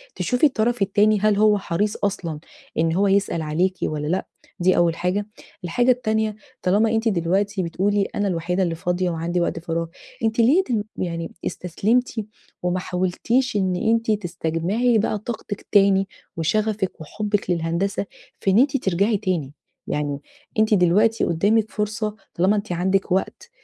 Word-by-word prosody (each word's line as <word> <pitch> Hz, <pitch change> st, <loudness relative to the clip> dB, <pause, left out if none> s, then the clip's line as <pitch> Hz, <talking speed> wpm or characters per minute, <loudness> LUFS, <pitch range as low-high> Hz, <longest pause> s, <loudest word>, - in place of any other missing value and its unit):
تشوفي 250 Hz, +4 st, +1 dB
الطرف 240 Hz, -4 st, +1 dB
التاني 205 Hz, +1 st, +3 dB
هل 210 Hz, 0 st, +3 dB
هو 210 Hz, -1 st, +5 dB
حريص 200 Hz, +3 st, -1 dB
أصلًا 170 Hz, -6 st, -2 dB, 0.4 s
إن 160 Hz, 0 st, +2 dB
هو 200 Hz, +3 st, +2 dB
يسأل 195 Hz, -4 st, +1 dB
عليكِ 175 Hz, +5 st, 0 dB
والّا 150 Hz, -1 st, -2 dB
لأ؟ 185 Hz, +4 st, -1 dB, 0.3 s
دي 185 Hz, +1 st, +3 dB
أول 170 Hz, -1 st, +3 dB
حاجة. 185 Hz, +3 st, -1 dB, 0.4 s
الحاجة 240 Hz, +9 st, +2 dB
التانية، 220 Hz, -3 st, 0 dB, 0.3 s
طالما 205 Hz, +5 st, +3 dB
أنتِ 225 Hz, +1 st, +1 dB
دلوقتي 195 Hz, +2 st, 0 dB
بتقولي 195 Hz, +4 st, 0 dB
أنا 205 Hz, -, 0 dB
الوحيدة 180 Hz, +1 st, 0 dB
اللي 170 Hz, -2 st, -1 dB
فاضية 180 Hz, +2 st, -1 dB
وعندي 170 Hz, +2 st, -1 dB
وقت 170 Hz, 0 st, -1 dB
فراغ، 165 Hz, 0 st, -2 dB, 0.4 s
أنتِ 225 Hz, +1 st, 0 dB
ليه 275 Hz, +12 st, +5 dB
تم 225 Hz, -, -1 dB
يعني 170 Hz, -2 st, -3 dB
استسلمتِ 210 Hz, +9 st, 0 dB, 0.5 s
وما 180 Hz, +1 st, 0 dB
حاولتيش 190 Hz, +8 st, 0 dB
إن 185 Hz, -2 st, +1 dB
أنتِ 225 Hz, +3 st, +1 dB
تستجمعي 185 Hz, +5 st, 0 dB
بقى 215 Hz, 0 st, 0 dB
طاقتِك 215 Hz, -2 st, -6 dB
تاني 195 Hz, -1 st, +4 dB, 0.3 s
وشغفِك 205 Hz, +2 st, -1 dB
وحُبِك 205 Hz, +4 st, -2 dB
للهندسة 170 Hz, +4 st, -1 dB, 0.3 s
في 195 Hz, -, +1 dB
إن 200 Hz, -, +5 dB
أنتِ 275 Hz, +1 st, +3 dB
ترجعي 200 Hz, 0 st, +1 dB
تاني؟ 175 Hz, -9 st, -2 dB, 0.3 s
يعني 145 Hz, -1 st, -2 dB, 0.4 s
أنتِ 215 Hz, 0 st, +3 dB
دلوقتي 205 Hz, +5 st, +3 dB
قُدّامِك 210 Hz, +6 st, +2 dB
فرصة 210 Hz, 0 st, -2 dB, 0.2 s
طالما 190 Hz, +5 st, +3 dB
أنتِ 205 Hz, -2 st, -3 dB
عندِك 190 Hz, +2 st, 0 dB
وقت 190 Hz, -, -1 dB
195 Hz, 150 wpm, -22 LUFS, 175-215 Hz, 0.5 s, هو